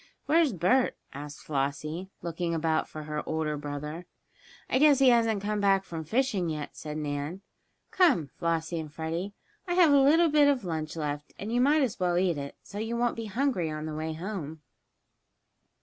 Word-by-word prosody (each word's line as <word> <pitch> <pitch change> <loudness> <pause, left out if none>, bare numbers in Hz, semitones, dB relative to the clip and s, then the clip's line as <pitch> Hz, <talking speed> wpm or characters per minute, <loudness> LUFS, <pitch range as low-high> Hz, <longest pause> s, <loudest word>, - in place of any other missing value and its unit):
"Where's 320 -1 +4
Bert?" 205 +8 +2 0.2
asked 145 +1 -8
Flossie, 150 +5 -2
looking 170 0 -2
about 160 0 0
for 155 - -7
her 150 0 -3
older 155 -1 -1
brother. 150 +3 -6 0.6
"I 260 - +1
guess 295 -1 +6
he 270 -1 +6
hasn't 225 -4 +3
come 210 0 -1
back 195 -1 +3
from 165 -4 -6
fishing 205 - 0
yet," 150 -2 -5
said 150 0 -6
Nan. 150 +4 -3 0.5
"Come, 305 - +4
Flossie 165 +2 -2
and 155 -2 -6
Freddie, 165 +6 -4 0.3
I 350 - 0
have 340 -5 +6
a 280 - +6
little 320 +5 +5
bit 295 -1 +5
of 270 -7 +1
lunch 160 -2 -3
left, 150 -2 -4
and 210 +3 -5
you 245 - +3
might 290 +3 +4
as 240 -6 -2
well 175 -1 +1
eat 175 -4 +1
it, 140 0 -6
so 205 - -8
you 225 +2 -2
won't 240 0 +1
be 230 - -5
hungry 220 - 0
on 155 0 -4
the 155 - -4
way 160 +1 -3
home." 160 -3 -6
175 Hz, 185 wpm, -28 LUFS, 155-235 Hz, 0.6 s, guess